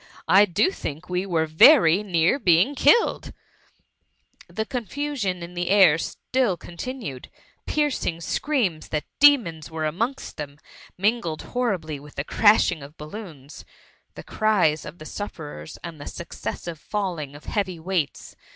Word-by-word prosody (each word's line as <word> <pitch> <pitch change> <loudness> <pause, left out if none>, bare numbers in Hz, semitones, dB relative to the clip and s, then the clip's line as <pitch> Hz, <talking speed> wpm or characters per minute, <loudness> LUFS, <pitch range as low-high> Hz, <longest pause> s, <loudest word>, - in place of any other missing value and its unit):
I 200 +2 +7
do 205 - +1
think 160 - -7
we 180 +2 -1
were 165 -3 +1
very 165 - +6
near 180 - +1
bdng 185 - +3
killed 295 - +3 1.2
i^ - - -20
The 220 - -1
confusion 240 -6 -3
in 170 +1 -9
the 175 0 -2
air 185 -6 +6
still 240 0 -1
continued; 175 - -7 0.4
piercing 290 - 0
screams 210 - -1
that 150 -1 -2 0.2
demons 225 - +4
were 160 -1 -3
amongst 230 - -3
them, 145 -2 -7 0.4
mingled 195 -5 0
horribly 185 - -2
with* 145 +1 -14
the 140 - -2
crashing 205 -3 +3
of 140 +3 -12
balloons, 155 -4 -10 0.5
the - - -9
cries 195 -9 +1
of 150 +3 -9
the 155 - -11
sufferers, 150 - -7
and 165 -4 -8
the - - -8
successive 170 -1 -6
falling 175 -10 -4
of 145 - -13
heavy 190 -4 -2
wei^ts. 165 -4 -3
180 Hz, 140 wpm, -24 LUFS, 155-220 Hz, 1.2 s, I